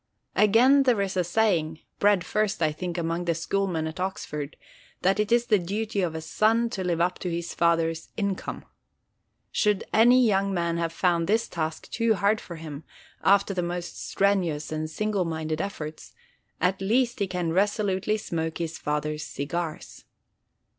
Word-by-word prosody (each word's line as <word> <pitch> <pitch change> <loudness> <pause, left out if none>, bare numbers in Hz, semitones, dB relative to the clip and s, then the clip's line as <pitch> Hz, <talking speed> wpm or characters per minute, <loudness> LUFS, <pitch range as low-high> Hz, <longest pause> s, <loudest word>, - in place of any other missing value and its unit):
Again 240 +7 +5
there 250 -5 +3
is 195 -1 -2
a 180 - +2
saying—bred 180 0 +1
first, 215 -2 0
I 155 - +3
think, 175 +3 -5
among 170 +1 -1
the 170 -1 +1
schoolmen 170 -1 -1
at 160 +2 -6
Oxford—that 185 +2 -4
it 210 0 0
is 240 0 +4
the 215 -4 +3
duty 205 +3 -2
of 170 -3 -1
a 160 - -4
son 225 +6 +2
to 190 -5 -3
live 175 -2 0
up 180 +1 +1
to 180 - -3
his 170 0 -3
father's 165 -1 +1
income. 200 -3 -3 0.9
Should 210 -2 +1
any 245 +3 +6
young 200 -2 +2
man 170 -1 0
have 165 -1 -1
found 170 -1 +1
this 225 +3 +2
task 160 -1 -4
too 230 -1 +2
hard 205 +2 +2
for 170 - -8
him, 155 -2 -8 0.4
after 200 0 +4
the 180 - -1
most 175 0 -4
strenuous 180 -7 +1
and 155 0 -3
single 210 +2 -1
minded 160 -1 -2
efforts, 155 -6 -6 0.4
at 185 +1 +1
least 240 +5 +1
he 200 - +1
can 180 -3 -2
resolutely 205 +1 +1
smoke 160 -5 -3
his 165 -1 -4
father's 150 0 -2
cigars. 155 +3 -5
180 Hz, 160 wpm, -26 LUFS, 165-205 Hz, 0.9 s, any